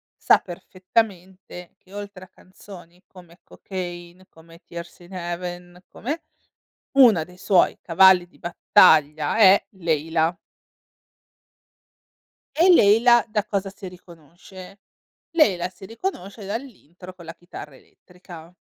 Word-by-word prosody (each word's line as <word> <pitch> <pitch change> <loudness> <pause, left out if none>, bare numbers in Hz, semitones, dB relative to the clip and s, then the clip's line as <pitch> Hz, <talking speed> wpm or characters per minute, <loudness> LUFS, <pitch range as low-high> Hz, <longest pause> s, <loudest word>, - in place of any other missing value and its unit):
sa - - +3
perfettamente, 185 -1 -5
che 185 - -22
oltre 205 -2 -9
a - - -23
canzoni 185 -2 -16
come 175 -1 -18
"Cocaine", 175 -1 -9
come 165 +1 -19
"Tears 170 0 -10
in 175 +2 -16
Heaven", 175 0 -7
come 265 +6 -5
e 330 - -9 0.8
1 215 -11 +6
dei 180 +2 -18
suoi 185 -1 +2
cavalli 180 +1 +4
di - - -26
battaglia 155 -3 +3
è 200 -2 +6
"Layla". 165 -2 -1 2.2
E 360 +3 +5
"Layla" 235 -2 +5
da 210 -2 -2
cosa 200 -2 -3
si 195 0 -11
riconosce? 180 +2 -14 0.5
"Layla" 200 - +2
si 185 +1 -16
riconosce 215 - -7
dall'intro 195 - -9
con 170 -3 -15
la 165 - -9
chitarra 165 -5 -12
elettrica. 175 -1 -16
180 Hz, 115 wpm, -22 LUFS, 175-200 Hz, 2.2 s, 1